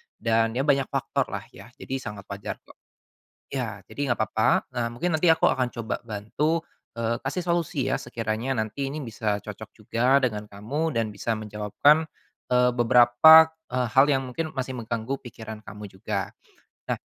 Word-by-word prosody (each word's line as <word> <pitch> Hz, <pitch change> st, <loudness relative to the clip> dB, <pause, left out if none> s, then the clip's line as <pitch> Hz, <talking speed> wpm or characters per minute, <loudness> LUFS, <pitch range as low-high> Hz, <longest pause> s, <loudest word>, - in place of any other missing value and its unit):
Dan, 115 Hz, 0 st, +1 dB
ya, 130 Hz, -, 0 dB
banyak 140 Hz, -2 st, +2 dB
faktor, -, -, -1 dB
lah, -, -, -4 dB
ya, -, -, -13 dB
jadi 135 Hz, -, -5 dB
sangat 105 Hz, -6 st, -7 dB
wajar, 100 Hz, 0 st, -5 dB
kok. -, -, -18 dB, 0.8 s
Ya, 115 Hz, -7 st, -3 dB
jadi 140 Hz, -4 st, -1 dB
nggak 115 Hz, -, -4 dB
papa, 110 Hz, 0 st, +2 dB
eee, 120 Hz, -1 st, 0 dB
mungkin 170 Hz, +7 st, -1 dB
nanti 170 Hz, +2 st, +2 dB
aku 160 Hz, -, +3 dB
akan 125 Hz, -1 st, 0 dB
coba 115 Hz, -1 st, -4 dB
bantu, 135 Hz, +10 st, -1 dB, 0.3 s
eee, 115 Hz, 0 st, 0 dB
kasih 175 Hz, +7 st, -2 dB
solusi, 170 Hz, -5 st, 0 dB
ya, -, -, +1 dB
sekiranya 115 Hz, +2 st, -3 dB
nanti 125 Hz, +6 st, -3 dB
ini 155 Hz, -, -5 dB
bisa 105 Hz, -2 st, -2 dB
cocok 105 Hz, 0 st, -9 dB
juga 120 Hz, +5 st, +2 dB
dengan 105 Hz, -4 st, -1 dB
kamu 140 Hz, +11 st, -3 dB
dan 115 Hz, -1 st, +1 dB
bisa 115 Hz, -, -2 dB
menjawabkan, 110 Hz, +9 st, +2 dB, 0.4 s
eee, 125 Hz, 0 st, +4 dB
beberapa, 125 Hz, +7 st, +7 dB, 0.2 s
eee, 125 Hz, 0 st, 0 dB
hal 135 Hz, +2 st, +7 dB
yang 135 Hz, -1 st, +2 dB
mungkin 155 Hz, +5 st, -4 dB
masih 130 Hz, 0 st, -3 dB
mengganggu 115 Hz, +3 st, -3 dB
pikiran 110 Hz, -1 st, -8 dB
kamu 105 Hz, 0 st, -9 dB
juga. 95 Hz, 0 st, -4 dB, 0.6 s
Nah, -, -, 0 dB
120 Hz, 170 wpm, -25 LUFS, 110-140 Hz, 0.8 s, beberapa